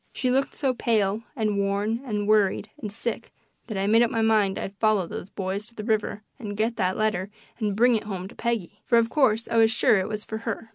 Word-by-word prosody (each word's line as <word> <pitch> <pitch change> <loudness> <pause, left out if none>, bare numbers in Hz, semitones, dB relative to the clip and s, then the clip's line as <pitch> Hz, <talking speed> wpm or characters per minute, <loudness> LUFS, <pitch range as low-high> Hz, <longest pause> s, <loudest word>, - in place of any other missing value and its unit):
She 255 - 0
looked 270 +2 +1
so 270 -3 0
pale 215 -3 +1
and 215 -4 0
worn 200 +4 0
and 210 -5 -2
worried 215 0 +2
and 210 -4 -4
sick 225 +2 -4 0.4
that 215 - -4
I 195 - 0
made 225 +3 +5
up 240 - +4
my 225 -1 0
mind 215 -3 +3
I'd 195 - -5
follow 215 -4 +3
those 175 - -7
boys 195 +2 -4
to 235 - -17
the 215 - -6
river 215 -1 -1 0.2
and 205 -4 -6
get 225 +2 0
that 185 +1 0
letter 205 -3 0 0.3
and 210 -3 -1
bring 245 +3 +5
it 220 - -2
home 190 -3 -5
to - - -13
Peggy 230 -6 -3
for, 235 - +3
of 230 0 +2
course, 230 -6 +2
I 230 - 0
was 225 -1 +6
sure 220 -2 +3
it 185 - -2
was 210 -1 -3
for 220 - -5
her. 225 0 -5
215 Hz, 240 wpm, -25 LUFS, 200-230 Hz, 0.4 s, was